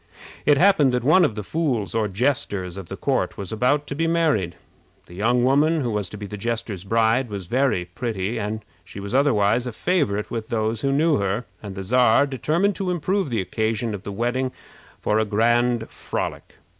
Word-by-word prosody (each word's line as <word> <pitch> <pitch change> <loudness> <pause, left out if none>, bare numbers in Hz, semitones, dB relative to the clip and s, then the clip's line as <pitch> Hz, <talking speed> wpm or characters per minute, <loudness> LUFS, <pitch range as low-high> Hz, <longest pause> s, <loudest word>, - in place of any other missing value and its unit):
It 145 - +6
happened 155 -6 +4
that 125 -1 0
one 155 +7 +5
of 110 - +1
the 105 - -4
fools 130 - -1
or 110 -2 +1
jesters 100 -5 -1
of 95 -3 -8
the - - -6
court - - -1
was 100 0 -6
about 125 +6 +1
to 145 - -5
be 165 +3 0
married. 155 - +1 0.5
The - - -15
young 120 +6 +1
woman 150 +5 +3
who 120 -3 -1
was 105 -4 -2
to 105 - -8
be 105 - -6
the 105 +1 -7
jester's 110 -3 -3
bride 115 +4 +2
was 100 -3 -5
very 125 -3 +1
pretty, 105 +3 -3
and 105 +1 -4 0.2
she - - -10
was 100 +3 -6
otherwise 120 -4 +3
a - - -3
favorite 110 - 0
with 115 -1 -4
those 110 -1 -1
who 135 - +1
knew 150 +2 +3
her, 100 +4 -1 0.2
and 100 -3 -7
the 95 - -5
Czar 125 +5 +4
determined 160 +8 0
to 190 -2 -2
improve 180 0 0
the 115 -4 0
occasion 110 +3 -1
of 100 - -5
the 100 - -6
wedding 120 +5 -1 0.5
for 105 - +1
a - - +3
grand 120 +2 +2
frolic. - - -5
115 Hz, 200 wpm, -23 LUFS, 105-140 Hz, 0.5 s, It